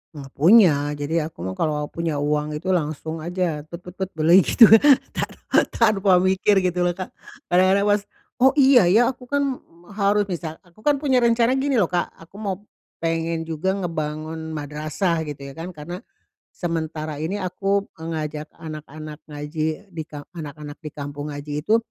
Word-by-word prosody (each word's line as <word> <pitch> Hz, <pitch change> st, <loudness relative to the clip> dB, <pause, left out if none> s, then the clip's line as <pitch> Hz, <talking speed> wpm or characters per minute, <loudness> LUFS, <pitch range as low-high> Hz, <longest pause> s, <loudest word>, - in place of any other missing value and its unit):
Enggak 135 Hz, -2 st, -9 dB
punya, 175 Hz, -2 st, +7 dB, 0.2 s
jadi 150 Hz, +2 st, -1 dB
aku 90 Hz, -, -10 dB
mah 95 Hz, -, -3 dB
kalau 150 Hz, -2 st, 0 dB
punya 165 Hz, -2 st, -2 dB
uang 150 Hz, +1 st, -1 dB
itu 180 Hz, +5 st, -2 dB
langsung 160 Hz, -1 st, -2 dB
aja 170 Hz, -1 st, -2 dB
tet 170 Hz, +2 st, -9 dB
tet 180 Hz, -, -9 dB
tet 190 Hz, +1 st, -4 dB
beli 165 Hz, +4 st, +6 dB
gitu, 230 Hz, -, +5 dB, 0.5 s
ta -, -, -2 dB, 0.5 s
tanpa 200 Hz, -5 st, +4 dB
mikir 190 Hz, +2 st, +3 dB
gitu 180 Hz, -1 st, 0 dB
loh, 175 Hz, -, -1 dB
Kak. 185 Hz, 0 st, -6 dB, 0.4 s
Kadang-kadang 185 Hz, +2 st, +4 dB
pas, 205 Hz, 0 st, +3 dB, 0.4 s
"Oh, 265 Hz, +2 st, +5 dB
iya 265 Hz, -, +6 dB
ya, 230 Hz, +7 st, +4 dB
aku 250 Hz, -1 st, -14 dB
kan 280 Hz, -2 st, 0 dB, 0.3 s
harus" 205 Hz, 0 st, +2 dB
misal 160 Hz, -2 st, -4 dB
aku 175 Hz, +2 st, -24 dB
kan 290 Hz, +6 st, +2 dB
punya 270 Hz, -3 st, +2 dB
rencana 235 Hz, +2 st, +3 dB
gini 275 Hz, 0 st, 0 dB
loh, 200 Hz, -8 st, +2 dB
Kak, 175 Hz, -1 st, +1 dB
aku 165 Hz, +3 st, -17 dB
mau 200 Hz, -3 st, -2 dB, 0.5 s
pengen 165 Hz, 0 st, -1 dB
juga 165 Hz, +4 st, -1 dB
ngebangun 160 Hz, -2 st, -4 dB
madrasah, 155 Hz, +3 st, -2 dB
gitu 145 Hz, -1 st, -7 dB
ya -, -, -12 dB
kan, 165 Hz, +5 st, -7 dB
karena 170 Hz, +4 st, -7 dB, 0.6 s
sementara 160 Hz, -3 st, -3 dB
ini 170 Hz, +6 st, -2 dB
aku 195 Hz, +1 st, -1 dB
ngajak 155 Hz, -2 st, -4 dB
anak-anak 155 Hz, -1 st, -8 dB
ngaji 155 Hz, +5 st, -4 dB
di 165 Hz, -2 st, -5 dB
kam 145 Hz, -1 st, -8 dB
anak-anak 150 Hz, -2 st, -8 dB
di 155 Hz, -, -6 dB
kampung 145 Hz, 0 st, -6 dB
ngaji 145 Hz, +1 st, -4 dB
itu 215 Hz, +8 st, +3 dB
165 Hz, 165 wpm, -23 LUFS, 155-195 Hz, 0.6 s, punya